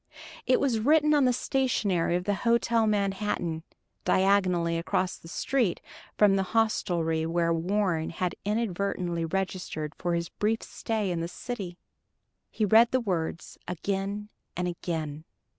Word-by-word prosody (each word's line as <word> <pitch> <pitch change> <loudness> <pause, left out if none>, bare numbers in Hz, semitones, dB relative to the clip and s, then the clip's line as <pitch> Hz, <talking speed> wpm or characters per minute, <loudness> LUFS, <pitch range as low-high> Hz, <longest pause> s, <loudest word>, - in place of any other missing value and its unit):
It 255 - +4
was 250 -5 +1
written 300 +5 +4
on 290 -3 +4
the 250 - +4
stationery 230 -9 +1
of 180 - -1
the 205 - 0
Hotel 235 +1 +2
Manhattan 195 -5 -1 0.4
diagonally 185 -4 +2
across 180 +2 0
the - - -14
street 230 +2 0 0.4
from 205 -2 +5
the - - +2 0.2
hostelry 170 -7 +1
where 170 0 +1
Warren 175 -1 0
had 180 +1 -2
inadvertently 195 -5 -1
registered 180 -4 -3
for 175 +1 -1
his 170 -1 -2
brief 220 +2 -1
stay 215 -4 -2
in 170 - -1
the 165 - -2
city. 190 -3 -6 0.7
He 215 - 0
read 225 +3 +6
the 260 - +2
words 175 -7 -3
again 195 +3 -3 0.3
and 180 0 0
again. 160 -3 -4
190 Hz, 140 wpm, -28 LUFS, 170-220 Hz, 0.7 s, read